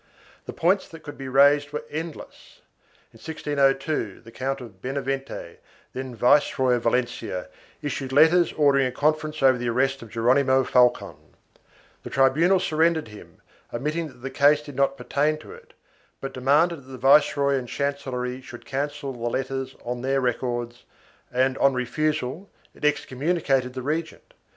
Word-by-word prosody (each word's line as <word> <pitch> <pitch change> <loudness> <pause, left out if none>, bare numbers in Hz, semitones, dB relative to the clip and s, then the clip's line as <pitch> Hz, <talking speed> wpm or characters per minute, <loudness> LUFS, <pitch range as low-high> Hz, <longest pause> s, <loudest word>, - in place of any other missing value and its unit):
The - - -4
points 185 +4 +1
that 165 -1 -13
could 145 0 -8
be 135 - -7
raised 145 +2 +4
were 150 - -4
endless. 160 +1 -8 0.5
In - - -15
1602, 140 -6 -1
the 115 - -14
Count 135 +3 -3
of 110 -7 -12
Benavente, 135 -7 -4 0.4
then 130 -1 -6
Viceroy 130 +1 +3
of 120 - 0
Valencia, 120 -7 -2 0.3
issued 135 -2 -3
letters 160 +5 +5
ordering 140 -3 +3
a - - -4
conference 155 +2 -1
over 130 -2 +5
the 120 0 -1
arrest 135 +3 0
of 115 - -10
Geronimo 130 +4 +3
Falcon; 125 -1 +2 0.8
the - - -8
tribunal 155 +8 +3
surrendered 160 -5 +1
him, 105 -1 -14 0.3
admitting 150 +7 -2
that 125 -4 -16
the 135 - -4
case 145 +2 +4
did 145 -2 -10
not 140 0 +1
pertain 145 +4 0
to - - -13
it, 470 +1 -15 0.5
but 135 0 -6
demanded 150 +7 +2
that 135 -2 -16
the 130 - -7
viceroy 140 +1 +4
and 130 -3 -2
chancellery 130 -2 -3
should 125 -2 -11
cancel 140 0 -3
the 120 - -12
letters 135 +1 -3
on 120 0 -3
their 135 +1 +1
records 120 -1 -2 0.5
and, 130 +1 +1
on 135 -1 +4
refusal, 150 +6 -2 0.2
it - - -18
excommunicated 140 -2 0
the 130 - -5
regent. 160 - -4
135 Hz, 155 wpm, -24 LUFS, 125-150 Hz, 0.8 s, letters